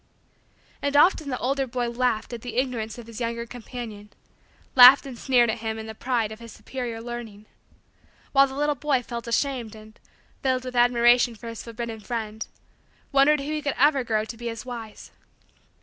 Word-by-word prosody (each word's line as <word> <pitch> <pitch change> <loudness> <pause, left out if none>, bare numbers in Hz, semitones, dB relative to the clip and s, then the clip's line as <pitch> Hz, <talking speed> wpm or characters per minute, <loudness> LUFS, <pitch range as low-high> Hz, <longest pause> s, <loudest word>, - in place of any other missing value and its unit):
And 285 0 +1
often 310 -2 +4
the 255 - -2
older 270 +2 -1
boy 245 0 -2
laughed 240 -1 -1
at 235 - -6
the 245 -1 -7
Ignorance 240 -4 -2
of 240 - -9
his 230 0 -9
younger 235 0 -2
companion 230 -3 -8 0.6
laughed 255 +2 +9
and 265 -2 -7
sneered 240 -1 +3
at 230 - -5
him 220 0 -3
in 220 - -6
the 220 - -7
pride 230 -2 -1
of 220 - -9
superior 240 -1 -6
learning 225 -3 -8 0.9
while 275 0 +5
the 265 - -9
little 295 +1 +1
boy 280 -3 0
felt 235 0 -6
ashamed 235 -2 -1
and, 215 0 -15 0.4
filled 255 -1 0
with 250 -1 -6
admiration 240 0 +4
for 230 +2 -9
his 230 - -7
forbidden 230 -1 -6
friend, 220 -1 -5 0.6
wondered 280 +1 +4
if - - -6
he 305 +1 -2
would 290 - -8
ever 280 -1 +4
grow 220 -2 0
to 225 - -8
be 235 0 -4
as 230 +1 -7
wise. 230 -4 -8
240 Hz, 180 wpm, -25 LUFS, 225-260 Hz, 0.9 s, laughed